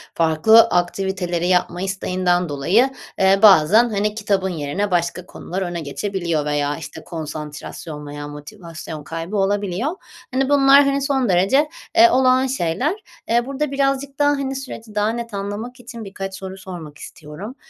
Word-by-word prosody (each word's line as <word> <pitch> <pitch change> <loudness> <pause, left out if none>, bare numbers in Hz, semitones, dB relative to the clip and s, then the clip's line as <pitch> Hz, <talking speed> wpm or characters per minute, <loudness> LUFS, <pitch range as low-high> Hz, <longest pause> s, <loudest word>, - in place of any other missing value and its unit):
farklı 165 +8 +5
aktiviteleri 180 -2 -1
yapma 180 -1 +1
isteğinden 180 -2 0
dolayı, 185 - +2 0.3
eee, 195 +1 +4
bazen, 210 +4 +6
hani, 210 0 -1
kitabın 200 -3 0
yerine 175 +5 -3
başka 175 +1 -1
konular 185 +1 -6
öne 175 -2 -3
geçebiliyor 170 0 -2
veya, 145 0 -1
işte, 160 - -9
konsantrasyon 150 -1 -7
veya 145 0 -7
motivasyon 160 0 -9
kaybı 165 +6 -5
olabiliyor. 200 - 0 0.4
Hani, 265 +1 +1
bunlar, 280 0 +6
hani, 275 0 +1
son 270 -5 0
derece, 230 - +3 0.3
eee, 345 +1 +8
olağan 260 0 +3
şeyler. 255 - -1 0.4
Eee, 235 +1 +2
burada 275 +1 -3
birazcık 275 0 -1
daha, 290 0 +4
hani, 275 -2 -1
süreci 230 -5 -8
daha 210 +1 +2
net 230 -1 -5
anlamak 205 +5 -5
için 235 -2 -9
birkaç 195 -1 -6
soru 190 0 -8
sormak 170 -6 -9
istiyorum. 170 - -9
195 Hz, 145 wpm, -20 LUFS, 170-245 Hz, 0.4 s, eee